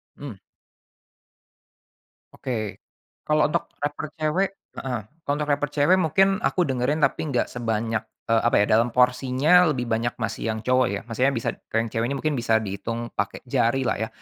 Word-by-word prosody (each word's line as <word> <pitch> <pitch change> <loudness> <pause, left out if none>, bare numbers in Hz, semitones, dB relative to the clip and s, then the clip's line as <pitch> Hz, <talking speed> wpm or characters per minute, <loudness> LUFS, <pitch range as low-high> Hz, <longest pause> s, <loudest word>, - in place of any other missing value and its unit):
Mmm. 135 -9 -8 2.0
Oke, 110 -5 -4 0.4
kalau 155 0 +3
untuk 150 - 0 0.2
raper 145 +1 -3
cewek 155 +6 +1 0.3
heeh, 125 -3 -3 0.3
untuk 150 +1 -1
raper 145 0 0
cewek 145 +5 +4
mungkin 185 +3 +3 0.2
aku 180 -5 +1
dengerin 130 +4 0
tapi 135 - +2
nggak 125 - +1
sebanyak, 115 -1 -2 0.2
eee, 115 -1 +3
apa 120 - +3
ya, - - +4
dalam 115 +3 +3
porsinya 130 +7 +4
lebih 125 -4 -3
banyak 115 +1 0
masih 110 0 -2
yang 110 - -4
cowok 125 +1 +3
ya, 100 - -2
maksudnya 125 +4 +1
bisa 115 - -1 0.2
kalau 115 - +2
yang - - -11
cewek 115 +1 0
ini - - -1
mungkin 155 0 0
bisa 115 -2 +2
dihitung 110 +3 -4 0.2
pake - - -2
jari 125 +4 +1
lah - - +1
ya. - - -2
125 Hz, 170 wpm, -24 LUFS, 115-145 Hz, 2.0 s, cewek